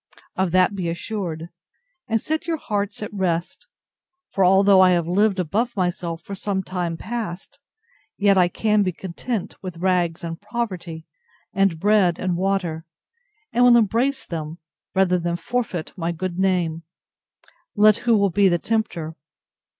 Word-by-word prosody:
Of 190 -1 +1
that 185 +3 +3
be 185 -4 -2
assured, 170 -2 -4 0.6
and 225 0 +1
set 315 +6 -3
your 330 -1 0
hearts 205 -5 -3
at 210 - -6
rest; 175 -3 -2 0.6
for 195 - +1
although 190 +1 +6
I 185 - +7
have 170 -2 +1
lived 200 +3 +2
above 215 +8 -1
myself 175 -2 -2
for 200 - -8
some 195 0 -2
time 175 -3 -3
past, 225 +3 -6 0.6
yet 200 -1 +4
I 180 -2 +5
can 210 +4 +1
be 185 -2 0
content 190 +5 -5
with 185 -3 -7
rags 175 -2 0
and 165 +1 -5
poverty, 185 -8 -4 0.5
and 195 -4 +2
bread 200 -3 +3
and 185 -1 -1
water, 180 -3 -1 0.7
and 245 +2 +3
will 245 -1 +7
embrace 240 +5 +1
them, 160 -1 -5 0.4
rather 185 -1 +3
than 170 0 -1
forfeit 180 -2 -3
my 170 -2 -2
good 180 +1 -4
name, 175 -4 +1 0.9
let 210 0 +6
who 235 -2 +2
will 200 -2 +2
be 200 +2 +4
the 175 - +2
tempter. 170 -6 -2
190 Hz, 150 wpm, -22 LUFS, 170-210 Hz, 0.9 s, I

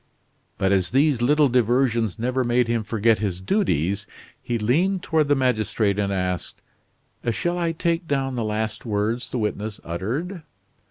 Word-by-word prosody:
But 95 0 +1
as 95 -3 +2
these 135 -1 +2
little 145 +4 +4
diversions 120 -3 +2
never 125 +3 0
made 120 0 +2
him 115 -1 0
forget 110 +1 +2
his 95 -4 -2
duties, 100 - 0 0.3
he 120 - -2
leaned 170 - +1
toward 155 -3 +2
the 145 - +4
magistrate 110 -5 +1
and 100 -1 0
asked: 90 -2 -2 0.7
"Shall 175 +9 -1
I 170 -1 +1
take 165 +1 -1
down 135 -2 0
the 120 -2 -2
last 110 0 -2
words 110 +2 -1
the - - -3
witness 105 -1 -3
uttered?" 125 - -4
120 Hz, 155 wpm, -23 LUFS, 105-140 Hz, 0.7 s, little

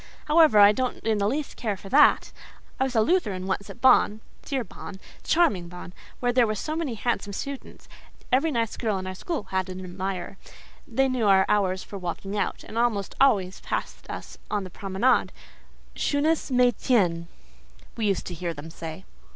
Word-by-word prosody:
However, 310 -7 +5
I 205 0 +9
don't 255 +3 -2
in 220 -1 +1
the 200 - +1
least 280 +6 -2
care 210 -4 -2
for 195 - -11
that. 295 +6 +5 0.5
I 265 - +3
was 260 -2 -4
a 220 - +5
Lutheran 210 - 0
once 195 +1 -3
at - - -11
Bonn—dear 255 +1 +2
Bonn!—charming 205 - -1
Bonn!—where 180 +7 -5
there 245 -2 +4
were 215 - -1
so 310 +9 -3
many 310 -8 -2
handsome 220 -2 -2
students. 275 +6 -7 0.4
Every 280 +6 +3
nice 230 -4 -1
girl 215 -4 -1
in 185 - -5
our 185 - -4
school 285 - -4
had 190 0 -1
an 185 0 -6
admirer; 185 +1 -5 0.5
they 270 0 +2
knew 250 -4 0
our 190 -1 +5
hours 190 -2 +1
for 200 - -8
walking 185 +3 -5
out, 205 - -2
and 230 - -5
almost 220 -5 0
always 195 -9 +3
passed - - -4
us - - -8
on 205 -2 -1
the 185 - -9
promenade: 195 +8 +1 0.6
'Schönes 300 +2 0
Mädchen,' 230 -8 +2 0.7
we 225 -3 -1
used 195 - 0
to 180 - -5
hear 170 0 -4
them 150 +3 -9
say. 160 - -8
210 Hz, 175 wpm, -26 LUFS, 190-255 Hz, 0.7 s, I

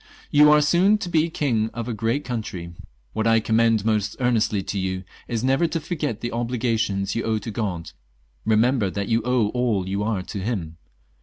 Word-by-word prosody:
" - - -22
You 150 0 +7
are 150 0 +6
soon 180 +7 +4
to 190 -4 -5
be 165 -1 +2
king 115 -9 0
of 115 0 -4
a 120 - -2
great 115 +6 -1
coun 120 -2 -2
try. 85 -5 -7 0.4
What 110 - 0
I 115 0 +5
commend 110 -1 +2
most 105 -2 0
earnestly 115 -5 +1
to 100 - -3
you 95 0 -2 0.2
is 115 -1 -2
never 135 +6 +3
to 165 - -2
forget 150 - -3
the 120 - -3
obligations 115 -4 -1
you 115 - -1
owe 110 -1 0
to 110 +2 -5
God. 95 -6 -3 0.6
Eemember 110 -1 +3
that 100 0 -3
you 115 0 +2
owe 125 -3 +2
all 115 -6 0
you 100 +1 -2
are 105 -3 -1
to 100 - -6
Him. 95 -7 -3
115 Hz, 205 wpm, -23 LUFS, 105-125 Hz, 0.6 s, You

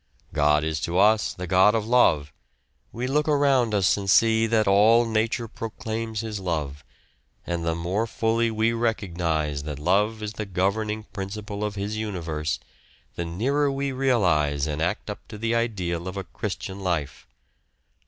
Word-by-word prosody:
God 75 0 +3
is 80 -1 -1
to 85 +5 -2
us 105 +2 +3
the 90 - -5
God 95 +5 +4
of 110 -1 -1
Love. 80 - +3 0.6
We 120 +2 -4
look 150 +4 +1
around 135 -7 +3
us 95 -3 +3
and 100 -1 -4
see 115 +2 +4
that 110 -2 +2
all 110 +4 +5
nature 115 +2 0
proclaims 110 0 -4
His 110 -2 -4
love, 75 -6 -3 0.6
and 85 -1 -2
the 80 0 0
more 90 +7 -1
fully 115 +1 +1
we 110 +1 +1
recognise 85 -10 -1
that 75 -1 -6
love 105 +8 +1
is 105 0 -4
the 110 -1 -5
governing 105 +4 -1
principle 100 +1 -5
of 105 0 -2
His 105 +2 -3
universe, 80 -7 -3 0.5
the 85 - -4
nearer 135 - 0
we 140 0 -2
realise 90 - +2
and 75 0 -3
act 90 +5 -1
up 105 - -7
to 110 - -9
the 115 +2 -1
ideal 95 -7 -1
of 95 +1 -5
a 95 - -3
Christian 95 0 -5
life. 85 -7 -3
105 Hz, 165 wpm, -25 LUFS, 85-115 Hz, 0.6 s, all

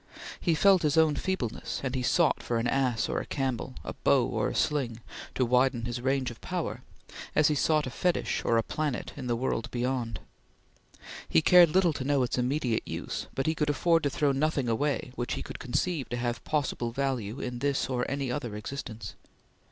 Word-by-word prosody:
He 170 -3 +1
felt 190 +3 +5
his 150 0 +1
own 160 -2 +5
feebleness, 185 - -3
and 130 -2 -2
he 130 - -1
sought 165 +6 +2
for 120 - -1
an 115 - -1
ass 125 -3 +1
or - - -1
a - - -7
camel, 130 -2 -2
a - - -5
bow - - +3
or - - -1
a - - -5
sling, 130 -7 0 0.4
to 130 - +2
widen 125 -1 +2
his 120 0 -3
range 130 -1 0
of 115 - -13
power, - - -3 0.5
as 150 0 +5
he - - +2
sought 155 +1 +2
fetish 180 +6 0
or 115 - +2
a 115 - +2
planet 150 -2 -3
in 130 -3 -6
the 120 - +1
world 125 -1 -2
beyond. 120 -4 -2 1.1
He 80 - +4
cared 175 -2 +8
little 175 0 +3
to 135 - -4
know 140 -1 +2
its 125 - -1
immediate 125 -2 0
use, - - -4
but 135 - -1
he 160 - +2
could 150 -2 -1
afford 165 +3 +3
to 145 - +1
throw 140 +1 +1
nothing 140 -1 0
away 130 +3 0
which 120 -1 -3
he - - -4
could - - -8
conceive 145 +3 -1
to 120 - -2
have 120 -1 -2
possible 140 -5 -1
value 125 -3 -2
in 125 -1 -4
this 140 +1 0
or 125 -2 -1
any 135 -2 -2
other 125 -5 -3
existence. 110 -3 -6
135 Hz, 200 wpm, -29 LUFS, 120-150 Hz, 1.1 s, cared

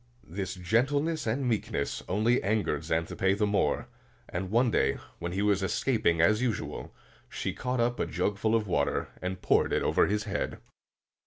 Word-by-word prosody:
This 95 +2 -4
gentleness 135 - +1
and 125 +4 0
meekness 105 -11 -1
only 110 +6 +2
angered 100 -8 0
Xanthippe 85 +4 0
the 105 - +2
more; 105 +3 +1 0.4
and 90 0 -4
one 120 +3 +3
day, - - +2 0.2
when 85 0 -3
he 100 +2 0
was 100 -2 +2
escaping 95 -4 +1
as 105 +6 +4
usual, 120 -4 -3 0.4
she - - -3
caught 125 0 -2
up 120 +1 +1
a - - 0
jug 95 +3 -1
full 110 +2 +2
of 110 -2 +1
water 95 - 0
and 90 0 -4
poured - - +3
it - - +1
over - - +3
his 105 +1 0
head. 105 -1 -3
105 Hz, 170 wpm, -29 LUFS, 95-115 Hz, 0.4 s, as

